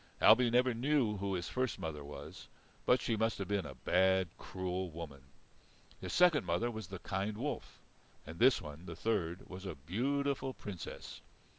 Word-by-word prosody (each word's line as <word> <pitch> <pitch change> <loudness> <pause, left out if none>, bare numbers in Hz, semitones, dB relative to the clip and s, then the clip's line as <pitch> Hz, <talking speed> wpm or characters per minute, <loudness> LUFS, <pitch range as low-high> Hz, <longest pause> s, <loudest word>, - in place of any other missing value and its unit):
Ailbe 115 +2 +7
never 125 +1 +4
knew 120 -3 +2
who 100 0 -1
his 85 -1 -3
first 130 -1 -1
mother 75 -3 -5
was, 70 +1 -9 0.4
but 125 - +6
she 115 - 0
must 110 +1 +1
have 100 - -3
been 100 -3 0
a 70 - -9
bad, 95 +6 +3
cruel 95 0 -3
woman. 80 -4 -8 0.8
His - - -5
second 175 -4 +5
mother 120 +1 0
was 110 -4 -6
the 95 - -6
kind 100 +4 -2
wolf. 145 +6 -4 0.5
And 80 +3 -9
this 130 +2 +6
one, 75 +3 -9
the 85 - -6
third, 90 -3 -1
was 95 0 -8
a - - -4
beautiful 135 - -1
Princess. 95 -5 -7
100 Hz, 170 wpm, -35 LUFS, 85-120 Hz, 0.8 s, Ailbe